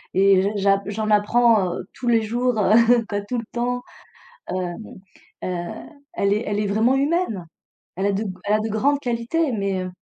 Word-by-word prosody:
et 195 0 +5
j 195 - +1
j'a 195 0 +2
j'en 215 +1 -2
apprends, 210 -2 +3
heu, - - -6
tous 245 - -7
les 230 -2 +3
jours, 240 +2 0
heu, 230 +3 +4
quoi 205 -1 -2
tout 245 +5 -4
le 230 - -4
temps. 245 +1 -2 0.7
Heu - - -3 0.9
heu, - - -2 0.7
elle 200 0 +1
est 210 +3 0
elle 205 0 -1
est 210 - 0
vraiment 220 +6 +2
humaine. 275 - 0 0.5
Elle 190 +3 0
a - - +2
de 200 +3 -2 0.2
elle 205 - 0
a - - +1
de 215 - -2
grandes 275 +7 +1
qualités 250 +5 -1
mais 195 -3 -1
heu, 185 - -6
215 Hz, 190 wpm, -22 LUFS, 200-240 Hz, 0.9 s, et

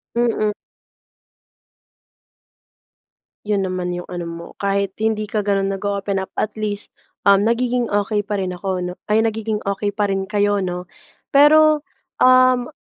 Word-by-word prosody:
Mm. 230 -3 +1 3.0
Yun 200 -2 +1
naman 180 -1 -2
yung 175 - -5
ano 175 -1 -4
mo, 170 0 -7
kahit 200 -1 0
hindi 220 -1 0
ka 210 0 -2
ganun 195 -1 0
nag-o-open 200 0 -2
up 190 - -6
at 215 - -1
least, 205 -1 -3 0.3
um, 200 -1 +6
nagiging 245 0 +1
okey 205 +1 0
pa 210 - -2
rin 190 -2 -2
ako, 180 0 -3
'no. 180 0 -4
Ay, 220 +1 +3
nagiging 220 -1 -2
okey 200 +1 -2
pa 205 -2 0
rin 195 0 -2
kayo, 205 -1 +1
'no? 180 -1 -3 0.5
Pero, 305 +1 +6 0.4
um, 255 -1 +5
205 Hz, 140 wpm, -20 LUFS, 195-220 Hz, 3.0 s, um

